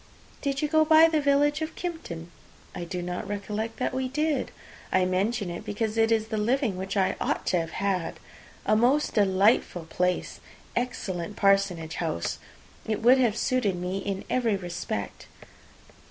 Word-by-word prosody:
"Did 280 Hz, 0 st, -1 dB
you -, -, +2 dB
go 315 Hz, +1 st, +4 dB
by 315 Hz, +1 st, +7 dB
the 315 Hz, -2 st, +1 dB
village 290 Hz, +2 st, +3 dB
of 315 Hz, +1 st, -4 dB
Kympton?" 185 Hz, -, -6 dB, 0.4 s
"I 175 Hz, -, -5 dB
do 180 Hz, 0 st, -4 dB
not 180 Hz, 0 st, -4 dB
recollect 210 Hz, +2 st, -4 dB
that 255 Hz, -, -1 dB
we 260 Hz, 0 st, -1 dB
did." 300 Hz, +3 st, 0 dB, 0.4 s
"I 185 Hz, 0 st, +3 dB
mention 195 Hz, +2 st, 0 dB
it 170 Hz, -, -6 dB
because 215 Hz, +1 st, -2 dB
it 225 Hz, 0 st, +3 dB
is 220 Hz, -1 st, +1 dB
the 215 Hz, -, -1 dB
living 235 Hz, -1 st, +1 dB
which 190 Hz, +2 st, -4 dB
I 190 Hz, -1 st, +2 dB
ought -, -, -1 dB
to 180 Hz, -, +4 dB
have 165 Hz, -1 st, -4 dB
had. 190 Hz, -4 st, -1 dB, 0.5 s
A 215 Hz, -, +3 dB
most 255 Hz, +7 st, +3 dB
delightful 195 Hz, -3 st, +3 dB
place! 180 Hz, +2 st, -1 dB, 0.4 s
Excellent 205 Hz, -7 st, -3 dB
parsonage 195 Hz, -5 st, +2 dB
house! 160 Hz, -, -2 dB, 0.5 s
It 220 Hz, 0 st, -2 dB
would 255 Hz, +3 st, +7 dB
have 235 Hz, -4 st, +2 dB
suited 250 Hz, -8 st, +1 dB
me 180 Hz, +2 st, -3 dB
in 195 Hz, -1 st, -3 dB
every 235 Hz, -5 st, +1 dB
respect." 175 Hz, -, -5 dB
210 Hz, 165 wpm, -27 LUFS, 185-255 Hz, 0.5 s, by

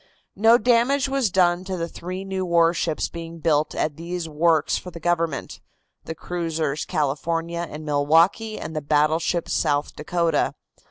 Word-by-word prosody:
No 225 Hz, +4 st, +6 dB
damage 245 Hz, +4 st, +2 dB
was 270 Hz, -4 st, +1 dB
done 180 Hz, -1 st, +2 dB
to 190 Hz, -1 st, -3 dB
the 170 Hz, -1 st, -2 dB
three 185 Hz, +3 st, -7 dB
new 190 Hz, -1 st, -3 dB
warships 170 Hz, -2 st, +1 dB
being 165 Hz, 0 st, -8 dB
built 155 Hz, -2 st, +1 dB
at 150 Hz, -2 st, -1 dB
these 170 Hz, 0 st, -4 dB
works 160 Hz, 0 st, +2 dB
for 180 Hz, -, -5 dB
the 170 Hz, -, -10 dB
government, 165 Hz, -3 st, -2 dB, 0.4 s
the 160 Hz, -, -5 dB
cruisers 160 Hz, -4 st, -3 dB
California 165 Hz, +4 st, -2 dB
and 155 Hz, +1 st, -8 dB
Milwaukee 165 Hz, +9 st, +2 dB
and 160 Hz, -, -7 dB
the 155 Hz, -, -1 dB
battleship 155 Hz, +4 st, +1 dB
South 145 Hz, 0 st, 0 dB
Dakota. 170 Hz, +2 st, 0 dB
170 Hz, 150 wpm, -23 LUFS, 155-180 Hz, 0.4 s, No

